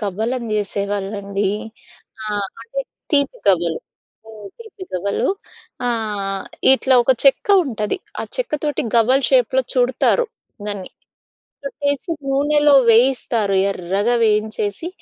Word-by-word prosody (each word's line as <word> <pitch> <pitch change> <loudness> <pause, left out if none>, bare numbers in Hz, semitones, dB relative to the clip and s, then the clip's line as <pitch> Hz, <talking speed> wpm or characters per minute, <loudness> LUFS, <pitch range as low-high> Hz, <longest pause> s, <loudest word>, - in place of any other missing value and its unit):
గవ్వలు 215 +4 -2
అని 235 -2 -7
చేసేవాళ్ళండి. 200 0 -2 0.8
ఆహ్, 205 -2 -2
అంటే - - -4 0.3
తీపి 280 -2 +1
గవ్వలు, 170 -4 +2 0.5
హ్మ్. 215 -2 -11
తీపి 445 -4 -12
గవ్వలు. 190 +2 -1 0.6
ఆహ్, 210 -4 -2 0.3
ఇట్లా 265 0 +3
ఒక 260 +2 +4
చెక్క 275 - +4 0.2
ఉంటది. 215 - -3 0.2
ఆ - - -2
చెక్కతోటి 300 -11 -2
గవ్వలు 255 +4 +3
షేప్‌లో 260 0 +3
చూడతారు 255 - +2 0.4
దాన్ని. 200 -3 -5 0.7
చుట్టేసి 285 +4 -2 0.2
నూనెలో 290 +1 +3 0.2
వేయిస్తారు 230 -3 +3 0.2
ఎర్రగా 195 +5 -1
వేయించేసి, 215 - 0
225 Hz, 105 wpm, -20 LUFS, 200-270 Hz, 0.8 s, ఒక